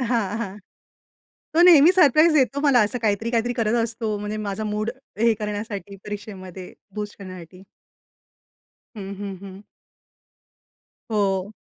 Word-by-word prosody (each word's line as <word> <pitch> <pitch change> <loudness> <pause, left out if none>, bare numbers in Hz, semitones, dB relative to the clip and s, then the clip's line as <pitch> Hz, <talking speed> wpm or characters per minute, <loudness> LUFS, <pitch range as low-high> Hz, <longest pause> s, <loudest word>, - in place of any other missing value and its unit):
हां, 230 -4 -1
हां. 200 -1 -5 1.0
तो - - +7
नेहमी 340 -1 +8
सरप्राईज 315 -2 +5
देतो 280 -1 +2
मला. 275 -6 +5
असं 240 +4 -2
काहीतरी-काहीतरी 230 +3 0
करत 230 -2 0
असतो. 225 -2 -3
म्हणजे 210 +1 -4
माझा 200 +2 -3
मूड 215 +1 -2 0.3
हे 230 0 +4
करण्यासाठी, 205 -2 -5
परीक्षेमध्ये 195 -3 -8 0.2
बूस्ट 210 0 -5
करण्यासाठी. 185 -1 -10 1.3
हं, 200 -1 -6
हं, 195 -2 -5
हं. 195 +1 -11 1.5
हो. 200 -1 0
210 Hz, 120 wpm, -23 LUFS, 200-235 Hz, 1.5 s, नेहमी